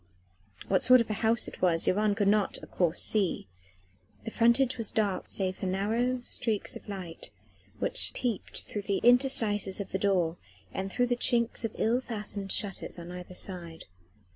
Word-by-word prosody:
What 190 - +2
sort 255 0 +7
of 230 -2 -1
a 210 - -4
house 225 0 +2
it - - -10
was 170 -3 +3
Yvonne 205 +1 +2
could 205 -2 +1
not, 205 0 +2
of - - -13
course, 175 -2 +1
see. 200 -5 0 0.8
The 225 - -4
frontage 235 +3 +3
was 225 - +1
dark 205 -4 -1
save 190 -1 -1
for 190 - -4
narrow 225 +7 0
streaks 225 -4 -1
of - - -11
light 185 -4 -6 0.5
which - - +2
peeped 240 -5 -3
through 210 - -5
the 200 -1 -1
interstices 230 -6 +3
of 200 - -6
the 190 - -2
door 180 -4 +1 0.4
and 195 0 -4
through 245 - +1
the 245 0 0
chinks 235 -1 +2
of 225 - -3
ill 235 +3 +1
fastened 210 -5 -4
shutters 195 -3 -1
on 170 0 -8
either 180 0 -9
side. 170 -4 -5
205 Hz, 175 wpm, -29 LUFS, 190-235 Hz, 0.8 s, sort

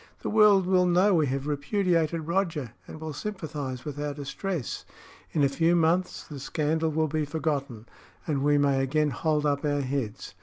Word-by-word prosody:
"The - - -2
world 210 -3 +6
will 180 -1 +3
know 185 +3 +4
we 155 -4 +3
have 135 +1 -2
repudiated 165 +2 0
Roger, 165 - -1 0.2
and 155 - -9
will 160 -1 -5
sympathise 145 -9 -5
with 145 -1 -5
our 145 -1 -3
distress. 150 +2 -4 0.5
In 150 - +1
a - - +6
few 165 +5 +2
months 170 +2 +1
the 145 -3 -8
scandal 155 +3 0
will 155 0 +1
be 155 +1 -1
forgotten, 145 -6 -3 0.4
and 145 -4 -1
we 145 +1 +3
may 140 -2 +2
again 150 +2 +1
hold 150 +3 0
up 145 0 +1
our 145 -1 +1
heads. 130 -8 -4
150 Hz, 180 wpm, -27 LUFS, 140-170 Hz, 0.5 s, world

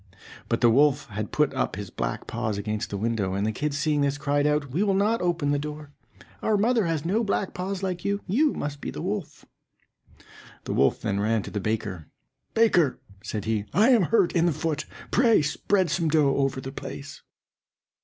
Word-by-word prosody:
But - - 0
the 120 - +6
wolf 140 +2 +3
had 105 0 -4
put 150 -2 +2
up 130 - -1
his 100 -2 -7
black - - -3
paws 110 -3 -2
against 105 +1 -3
the 100 - -3
window, 105 -3 -1
and 100 +1 0
the 110 - +1
kids 145 +5 -2
seeing 150 0 +1
this, 140 0 +1
cried 145 0 +1
out, 150 -2 0
"We 165 +9 0
will 200 -2 +2
not 210 +4 +2
open 170 -5 0
the 145 - +1
door; 150 0 -7 0.5
our 215 -1 +2
mother 225 -1 +2
has 165 -2 -1
no 210 +7 +1
black 200 -2 -1
paws 190 +1 -4
like 180 -2 -2
you; 200 0 0
you 285 - +2
must 145 -1 -5
be - - -4
the - - -6
wolf." 195 -2 -4 1.2
The - - -3
wolf 70 - +3
then 100 0 -1
ran 110 0 +1
to - - -9
a - - +1
baker. 100 -6 -3 0.5
"Baker," 180 - +3 0.2
said 105 -3 -4
he, 110 -2 -1
"I 215 +7 +5
am 240 -5 +6
hurt 205 -2 +3
in 170 0 +3
the 170 - +2
foot; 155 0 -2 0.3
pray 230 -9 +4
spread 180 +4 +1
some 165 0 +1
dough 150 -3 +3
over 135 -1 0
the 135 0 -6
place." 140 +1 -8
150 Hz, 205 wpm, -26 LUFS, 115-185 Hz, 1.2 s, the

